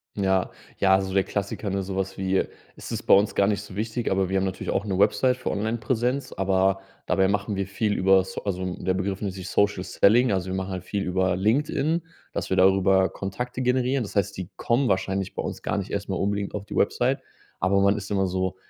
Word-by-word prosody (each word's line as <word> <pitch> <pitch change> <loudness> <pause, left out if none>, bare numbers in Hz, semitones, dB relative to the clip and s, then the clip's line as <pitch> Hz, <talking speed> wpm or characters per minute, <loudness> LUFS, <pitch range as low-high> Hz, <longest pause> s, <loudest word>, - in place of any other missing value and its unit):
Ja, 95 -2 +1 0.3
ja, 95 -1 +4
also 95 0 +2
der 95 - +4
Klassiker, 100 0 -3
ne, 100 0 -1
sowas 95 0 -3
wie: 95 0 +1 0.3
„Es - - -9
ist - - -2
bei - - +6
uns 100 +2 +3
gar 100 - +3
nicht 100 -2 0
so 100 -2 -11
wichtig.” 110 +3 -2
Aber 95 -1 +1
wir 95 - +1
haben 95 - +1
natürlich 95 0 -3
auch 100 - -1
'ne 95 -2 -1
Website 125 +5 +3
für 125 - -3
Online-Präsenz. 120 +5 -1
Aber 95 0 +1 0.3
dabei 95 -1 +3
machen 100 +1 -1
wir 100 0 -1
viel 105 +1 -1
übers 95 0 +3
also 95 -2 -2
der 95 - -1
Begriff 95 +1 -2
nennt 100 -3 -2
sich 95 -1 -7
Social 100 -2 +1
Selling. 120 +6 +4
Also 95 -1 -1
wir - - -2
machen 95 0 -3
halt 90 -1 -4
viel 100 +1 -3
über 95 0 +1
LinkedIn, 145 - +1 0.3
dass - - -4
wir 95 - +2
darüber 95 0 +4
Kontakte 125 +6 -4
generieren. 125 +1 +1
Das 105 - -8
heißt, 100 -1 0
die 95 0 -5
kommen 125 +2 +1
wahrscheinlich 95 0 -1
bei - - -3
uns - - -5
gar 100 - -1
nicht 100 - -5
erst 100 0 -3
mal 95 - -1
unbedingt 100 +1 -1
auf 100 -1 -4
die - - -7
Website, - - +1 0.4
aber 100 +2 +2
man 100 +1 +3
ist 100 -1 -7
immer 95 -2 +2
so: 95 0 -1
100 Hz, 225 wpm, -25 LUFS, 95-105 Hz, 0.4 s, bei